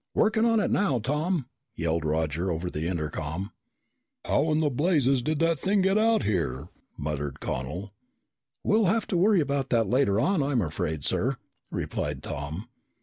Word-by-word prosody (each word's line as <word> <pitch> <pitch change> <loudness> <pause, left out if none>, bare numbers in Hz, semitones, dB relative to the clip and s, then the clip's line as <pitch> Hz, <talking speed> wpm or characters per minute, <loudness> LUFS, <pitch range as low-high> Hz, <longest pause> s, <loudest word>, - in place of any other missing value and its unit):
"Working 220 +1 +3
on 230 -1 +4
it - - 0
now, 170 -11 +2
Tom!" 150 - -1 0.3
yelled 85 -1 -1
Roger 80 +3 0
over 85 +1 -2
the 80 +2 -2
intercom. 80 +3 -3 0.7
"How 155 +3 +2
in 155 0 +2
blazes 140 -4 +3
did 155 +5 -1
that 165 -2 +2
thing 195 +5 +2
get 190 +1 +3
out 220 0 +3
here?" 80 -7 -1 0.3
muttered 75 -2 -3
Connel. 85 +11 -4 0.7
"We'll 215 0 +3
have 215 +4 +2
to - - 0
worry 195 0 +4
about 140 -2 -1
that 115 -4 +2
later, 115 -3 +2
I'm 180 +6 +2 0.2
afraid, 80 -4 -2
sir," 130 - +1 0.3
replied 75 -2 -3
Tom. 75 +9 -5
120 Hz, 150 wpm, -27 LUFS, -, 0.7 s, on